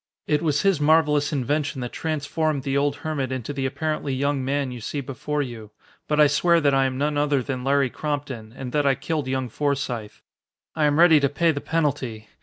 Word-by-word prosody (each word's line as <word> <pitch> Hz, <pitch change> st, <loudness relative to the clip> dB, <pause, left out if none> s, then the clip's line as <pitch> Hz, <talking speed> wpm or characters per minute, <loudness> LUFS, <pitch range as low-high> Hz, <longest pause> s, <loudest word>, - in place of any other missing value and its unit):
It 150 Hz, -1 st, +1 dB
was 150 Hz, -3 st, +1 dB
his 195 Hz, -6 st, +2 dB
marvelous 150 Hz, -1 st, +3 dB
invention 145 Hz, +1 st, -1 dB
that 125 Hz, -, -4 dB
transformed 155 Hz, -2 st, -2 dB
the 135 Hz, 0 st, -1 dB
old 145 Hz, +1 st, +1 dB
hermit 140 Hz, -5 st, -2 dB
into 130 Hz, +1 st, -4 dB
the 135 Hz, -1 st, -1 dB
apparently 150 Hz, -1 st, -2 dB
young 140 Hz, 0 st, 0 dB
man 135 Hz, 0 st, -1 dB
you 125 Hz, -1 st, -7 dB
see 145 Hz, -, -4 dB
before 140 Hz, +2 st, -3 dB
you. 115 Hz, -5 st, -8 dB, 0.4 s
But 150 Hz, 0 st, +1 dB
I 150 Hz, -, +8 dB
swear 170 Hz, +4 st, +3 dB
that 145 Hz, -3 st, +2 dB
I 135 Hz, 0 st, +3 dB
am 130 Hz, -1 st, -2 dB
none 145 Hz, +1 st, 0 dB
other 145 Hz, -3 st, +1 dB
than 130 Hz, -2 st, -4 dB
Larry 135 Hz, -1 st, +2 dB
Crompton 140 Hz, -7 st, -4 dB
and 130 Hz, -2 st, -6 dB
that 145 Hz, 0 st, +1 dB
I 135 Hz, -, +4 dB
killed 155 Hz, -3 st, -3 dB
young 130 Hz, -1 st, -1 dB
Forsythe. 125 Hz, -6 st, -3 dB, 0.5 s
I 155 Hz, -2 st, +2 dB
am 145 Hz, 0 st, +2 dB
ready 165 Hz, -2 st, +7 dB
to 140 Hz, -1 st, +2 dB
pay 165 Hz, +4 st, +2 dB
the 145 Hz, -2 st, -4 dB
penalty. 135 Hz, -9 st, -2 dB
145 Hz, 210 wpm, -24 LUFS, 130-150 Hz, 0.5 s, I